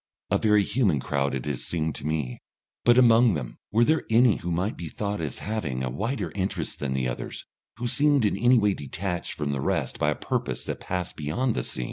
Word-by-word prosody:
A -, -, +3 dB
very 105 Hz, -2 st, +4 dB
human 100 Hz, -, +1 dB
crowd 70 Hz, +1 st, -1 dB
it 65 Hz, -, -4 dB
has 70 Hz, -4 st, -2 dB
seemed 80 Hz, -2 st, -1 dB
to 75 Hz, -, -5 dB
me. 75 Hz, -6 st, -2 dB, 0.4 s
But 120 Hz, 0 st, +6 dB
among 120 Hz, -4 st, +6 dB
them 65 Hz, -5 st, -6 dB
were 115 Hz, +3 st, +4 dB
there 160 Hz, +4 st, +2 dB
any 115 Hz, -1 st, +5 dB
who 90 Hz, -, -5 dB
might 90 Hz, +6 st, -1 dB
be 85 Hz, -2 st, -6 dB
thought 100 Hz, -1 st, -3 dB
of 80 Hz, -, -1 dB
as 70 Hz, -, -7 dB
having 80 Hz, -13 st, -3 dB
a 65 Hz, -, -2 dB
wider 115 Hz, -, -2 dB
interest 95 Hz, -1 st, -3 dB
than 70 Hz, -2 st, -2 dB
the 65 Hz, -1 st, 0 dB
others, -, -, -5 dB, 0.3 s
who 120 Hz, -, -4 dB
seemed 140 Hz, 0 st, +3 dB
in 105 Hz, -, +2 dB
any 120 Hz, +5 st, +4 dB
way 105 Hz, -3 st, +3 dB
detached 85 Hz, +4 st, -4 dB
from 75 Hz, -1 st, -2 dB
the 70 Hz, -2 st, -2 dB
rest -, -, -1 dB
by 75 Hz, -, +2 dB
a 75 Hz, -, 0 dB
purpose 60 Hz, 0 st, -3 dB
that -, -, -4 dB
passed 90 Hz, -1 st, -3 dB
beyond 80 Hz, -, 0 dB
the 60 Hz, -, -2 dB
seen? -, -, -2 dB
90 Hz, 225 wpm, -26 LUFS, 70-115 Hz, 0.4 s, But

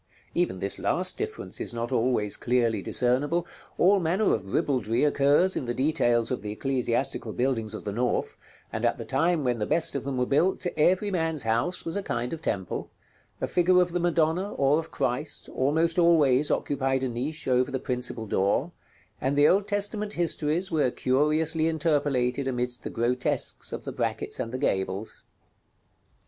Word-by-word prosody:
Even 175 Hz, -, 0 dB
this 100 Hz, +2 st, -2 dB
last -, -, +1 dB
difference -, -, -5 dB
is -, -, -4 dB
not 115 Hz, 0 st, -3 dB
always 115 Hz, -4 st, +1 dB
clearly 115 Hz, -4 st, +1 dB
discernible: 145 Hz, -, 0 dB, 0.3 s
all 195 Hz, +3 st, +5 dB
manner 185 Hz, +5 st, +1 dB
of 95 Hz, -2 st, -3 dB
ribaldry 120 Hz, -3 st, +1 dB
occurs 145 Hz, +5 st, +3 dB
in -, -, -2 dB
the 120 Hz, 0 st, -3 dB
details 120 Hz, -5 st, +1 dB
of 125 Hz, -, -2 dB
the 105 Hz, -, -5 dB
ecclesiastical 120 Hz, -3 st, -1 dB
buildings 115 Hz, -4 st, -1 dB
of -, -, -7 dB
the 100 Hz, -, -3 dB
North, 120 Hz, +3 st, -1 dB, 0.4 s
and -, -, -3 dB
at -, -, +2 dB
the -, -, -6 dB
time 165 Hz, -1 st, +1 dB
when 125 Hz, -2 st, 0 dB
the 105 Hz, -, -1 dB
best 165 Hz, -, +2 dB
of -, -, -3 dB
them 135 Hz, -1 st, -3 dB
were 125 Hz, -, +1 dB
built, 170 Hz, +9 st, +1 dB
every 185 Hz, +6 st, +2 dB
man's 160 Hz, -5 st, 0 dB
house 115 Hz, +11 st, 0 dB
was 165 Hz, -, -3 dB
a 200 Hz, -, -1 dB
kind 120 Hz, -8 st, -3 dB
of 165 Hz, -, -6 dB
temple; 95 Hz, -, -3 dB, 0.5 s
a -, -, -1 dB
figure 180 Hz, +1 st, +3 dB
of 180 Hz, -1 st, +2 dB
the 175 Hz, -, -1 dB
Madonna, 170 Hz, +3 st, +1 dB
or 140 Hz, +3 st, +3 dB
of 165 Hz, -, -7 dB
Christ, 130 Hz, +5 st, -3 dB
almost 160 Hz, +6 st, +1 dB
always 150 Hz, -5 st, +4 dB
occupied 135 Hz, -2 st, 0 dB
a -, -, +1 dB
niche 135 Hz, +6 st, -4 dB
over 125 Hz, 0 st, +2 dB
the 135 Hz, -, -2 dB
principal 125 Hz, -3 st, -3 dB
door, 100 Hz, -1 st, 0 dB, 0.5 s
and 135 Hz, +2 st, 0 dB
the 145 Hz, +1 st, +6 dB
Old 195 Hz, +2 st, +3 dB
Testament 205 Hz, +1 st, +1 dB
histories 170 Hz, +1 st, 0 dB
were 150 Hz, -5 st, +2 dB
curiously 155 Hz, +6 st, +1 dB
interpolated 145 Hz, -5 st, 0 dB
amidst 125 Hz, -1 st, -2 dB
the -, -, -5 dB
grotesques 120 Hz, +2 st, -1 dB
of -, -, -6 dB
the -, -, -4 dB
brackets -, -, -3 dB
and 115 Hz, -, -3 dB
the 130 Hz, -, -3 dB
gables. 95 Hz, -4 st, -2 dB
135 Hz, 175 wpm, -27 LUFS, 120-165 Hz, 0.5 s, the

